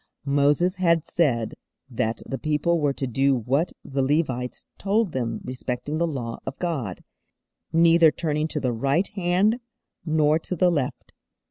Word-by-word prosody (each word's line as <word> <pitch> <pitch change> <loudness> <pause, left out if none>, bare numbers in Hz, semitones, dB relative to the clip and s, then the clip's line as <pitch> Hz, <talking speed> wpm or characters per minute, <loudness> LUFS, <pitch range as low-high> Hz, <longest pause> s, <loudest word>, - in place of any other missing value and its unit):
Moses 145 +6 +2
had 170 -3 +2
said 120 -10 +1 0.3
that 115 -3 -2
the 135 - -4
people 155 +3 +1
were 145 -1 +2
to 135 - -3
do 135 +2 +2
what 135 +8 0
the 135 0 -1
Levites 130 -3 -1
told 205 0 +1
them 115 -4 -3
respecting 130 +4 -4
the 170 - +2
Law 120 -7 -4
of 135 - -6
God, 140 - -3 0.7
neither 165 0 +6
turning 155 -2 -1
_'to 155 - -3
the 125 -4 -1
right 140 - +1
hand, 195 +4 +1 0.4
nor 155 -1 +2
to 180 - -5
the 180 +1 +3
left. 140 -5 -3
150 Hz, 150 wpm, -24 LUFS, 130-170 Hz, 0.7 s, neither